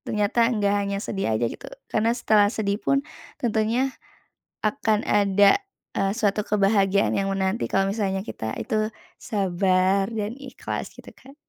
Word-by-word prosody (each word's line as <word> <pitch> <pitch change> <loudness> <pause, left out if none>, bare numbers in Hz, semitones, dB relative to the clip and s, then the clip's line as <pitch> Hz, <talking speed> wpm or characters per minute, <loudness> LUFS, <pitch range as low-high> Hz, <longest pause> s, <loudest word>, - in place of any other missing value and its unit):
Ternyata 215 +3 +1
nggak 205 -4 +1
hanya 200 0 -2
sedih 195 -1 -3
aja 120 - 0
gitu. 115 - -5 0.2
Karena 220 +1 +2
setelah 215 -4 +4
sedih 205 -1 -2
pun 275 0 +1 0.3
tentunya 235 +3 0 0.7
akan 215 -1 +1
ada, 200 0 +5 0.4
eee, 195 0 +1
suatu 210 -2 0
kebahagiaan 200 -1 +2
yang 195 0 0
menanti 190 +3 0
kalau 195 0 +2
misalnya 195 -2 -1
kita 110 - -5
itu 215 0 -1 0.2
sabar 190 -1 +1
dan 215 +2 -3
ikhlas 270 -2 -6
gitu - - -14
Kak. 270 +2 -16
205 Hz, 140 wpm, -24 LUFS, 195-220 Hz, 0.7 s, ada